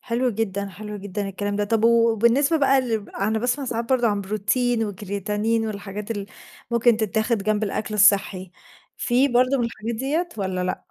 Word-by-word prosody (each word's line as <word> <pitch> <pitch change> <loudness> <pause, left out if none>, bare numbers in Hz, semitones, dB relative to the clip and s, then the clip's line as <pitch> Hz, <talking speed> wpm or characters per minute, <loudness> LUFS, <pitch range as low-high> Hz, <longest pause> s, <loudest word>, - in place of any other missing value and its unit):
حلو 245 +1 0
جدًا، 200 -2 -2
حلو 210 +1 -8
جدًا 200 0 -4
الكلام 205 +1 -3
ده. 205 - 0
طب 225 +2 0
وبالنسبة 235 +6 +4
بقى 275 -2 +4
لل 225 -5 -3
أنا 215 +3 0
باسمع 245 +5 -1
ساعات 235 -2 -2
برضه 245 -3 +3
عن 205 -1 0
بروتين 225 +4 0
وكرياتين 210 +3 -2
والحاجات 205 0 -6
اللي 205 -3 -3 0.4
ممكن 235 -1 +3
تتاخد 220 0 0
جنب 215 +1 0
الأكل 215 +1 -3
الصحي، 195 -2 +3 0.5
في 255 +3 +2
برضه 255 +2 +3
من 240 - +1
الحاجات 230 0 -4
ديّة 295 +9 -1
والّا 185 -2 -2
لأ؟ 185 - -5
220 Hz, 170 wpm, -23 LUFS, 205-240 Hz, 0.5 s, وبالنسبة